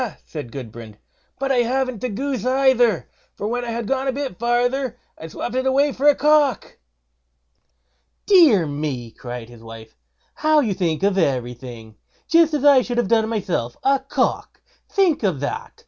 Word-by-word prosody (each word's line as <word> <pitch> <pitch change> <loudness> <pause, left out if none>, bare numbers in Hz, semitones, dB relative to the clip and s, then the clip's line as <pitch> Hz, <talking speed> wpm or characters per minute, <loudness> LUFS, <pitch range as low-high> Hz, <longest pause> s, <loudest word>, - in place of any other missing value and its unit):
said 145 -7 -8
Gudbrand, 115 -4 -9 0.4
"but 275 0 -2
I 265 - +2
haven't 255 -1 0
the 250 - -2
goose 255 +1 -3
either; 255 - +2 0.3
for - - -6
when 245 +2 -2
I 240 - -5
had 230 -1 -4
gone 270 +1 -1
a - - +2
bit 270 -7 -5
farther 245 +1 0 0.2
I 160 - -9
swopped 220 +8 -6
it 260 +1 -1
away 275 +2 +2
for 280 +3 0
a 290 - +6
cock." 295 -4 +1 1.5
"Dear 315 - +5
me!" 145 -5 -4
cried 120 -1 -8
his 120 -1 -15
wife, 115 -1 -12 0.4
"how 310 0 +2
you 225 -8 0
think 175 -2 -2
of 195 -1 +2
everything! 120 - -3 0.3
just 325 -2 +4
as 290 -1 -2
I 280 -3 +7
should 245 -1 -4
have 240 -5 0
done 220 -1 +2
myself. 175 - -3
A 275 0 +3
cock! 270 - -2 0.3
think 380 -6 +2
of 185 - 0
that! 145 - -4
235 Hz, 170 wpm, -21 LUFS, -, 1.5 s, I